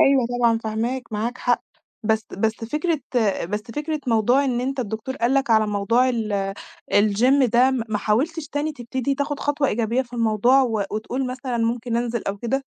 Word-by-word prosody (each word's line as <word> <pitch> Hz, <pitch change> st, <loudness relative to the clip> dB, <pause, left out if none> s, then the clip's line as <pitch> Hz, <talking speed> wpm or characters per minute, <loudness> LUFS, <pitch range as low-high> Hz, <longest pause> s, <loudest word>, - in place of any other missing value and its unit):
أيوه 270 Hz, -3 st, +5 dB
طبعًا 230 Hz, -2 st, +3 dB
فاهماك، 230 Hz, +2 st, -3 dB
معاك 225 Hz, +4 st, -2 dB
حق. 245 Hz, -1 st, +1 dB, 0.4 s
بس 220 Hz, 0 st, 0 dB
بس 220 Hz, +2 st, +2 dB
فكرة 300 Hz, +5 st, -1 dB, 0.5 s
بس 210 Hz, +3 st, -3 dB
فكرة 300 Hz, +6 st, -4 dB
موضوع 240 Hz, +4 st, +3 dB
إن 245 Hz, -3 st, 0 dB
أنت 270 Hz, +1 st, -2 dB
الدكتور 230 Hz, +4 st, -4 dB
قال 240 Hz, +2 st, +1 dB
لك 270 Hz, -2 st, +1 dB
على 220 Hz, -1 st, +4 dB
موضوع 210 Hz, +5 st, +2 dB
ال 205 Hz, -5 st, -1 dB, 0.4 s
الgym 230 Hz, +7 st, +4 dB
ده، 250 Hz, +2 st, +5 dB
م 260 Hz, -3 st, -1 dB
ما 210 Hz, -1 st, -1 dB
حاولتش 295 Hz, +11 st, 0 dB
تاني 300 Hz, +2 st, -2 dB
تبتدي 260 Hz, +1 st, -2 dB
تاخد 285 Hz, +1 st, -3 dB
خطوة 290 Hz, -1 st, +1 dB
إيجابية 230 Hz, +3 st, 0 dB
في 245 Hz, -1 st, -20 dB
الموضوع 235 Hz, +3 st, +3 dB
و 220 Hz, -5 st, 0 dB
وتقول 245 Hz, +5 st, -2 dB
مثلًا 255 Hz, -1 st, -4 dB
ممكن 230 Hz, +1 st, -1 dB
أنزل 235 Hz, -1 st, -1 dB
أو 200 Hz, -, -2 dB
كده؟ 265 Hz, +5 st, -1 dB
240 Hz, 180 wpm, -23 LUFS, 220-270 Hz, 0.5 s, أيوه